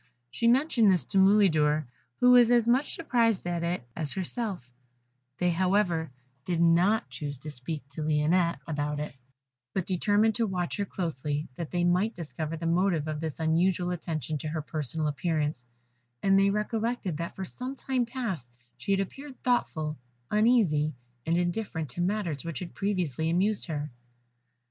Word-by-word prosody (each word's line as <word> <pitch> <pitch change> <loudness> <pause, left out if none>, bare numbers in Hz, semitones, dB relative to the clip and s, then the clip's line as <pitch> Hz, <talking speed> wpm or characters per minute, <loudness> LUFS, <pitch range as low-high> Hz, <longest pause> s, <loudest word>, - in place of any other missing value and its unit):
She 235 - 0
mentioned 240 -4 +4
this 180 -3 +1
to 195 - +1
Mulidor, 160 -7 +4 0.3
who 250 0 +6
was 245 -2 +7
as 240 -2 +4
much 255 +4 +2
surprised 230 - +1
at 175 -1 -1
it 170 -7 -2
as 155 -4 -2
herself; 190 - -3 0.7
they, 180 0 +2
however, 180 -2 +1 0.3
did 170 +2 -1
not 175 +6 +4
choose 145 -2 -5
to 150 +4 -7
speak 140 +1 -5
to 140 +2 -7
her 170 +3 +2
about 150 -2 -2
it, 150 -2 -5 0.6
but 190 - 0
determined 205 +4 +2
to 230 0 0
watch 180 -3 -2
her 200 - 0
closely, 150 -5 -3
that 165 +2 -5
they 175 -1 0
might 180 +6 +2
discover 160 -1 -4
the 165 - -5
motive 170 -2 +2
of 155 -1 -3
this 160 -1 -4
unusual 175 +3 +2
attention 155 -4 -3
to 155 - -4
her 155 0 -3
personal 155 0 -3
appearance, 150 -3 -1 0.6
and 195 0 +5
they 195 0 +4
recollected 210 -3 -1
that 170 +1 -5
for 190 - -4
some 255 +8 -5
time 255 -3 -1
past 215 - -4 0.3
she 200 - -1
had 195 - +2
appeared 270 +7 -7
thoughtful, 155 - 0 0.3
uneasy, 210 - +3 0.3
and 165 +1 +2
indifferent 175 -3 -2
to 175 - -4
matters 175 -6 -1
which 165 -2 -5
had 180 - -6
previously 175 -7 -1
amused 195 +5 +1
her. 150 -3 -3
175 Hz, 165 wpm, -28 LUFS, 155-210 Hz, 0.7 s, was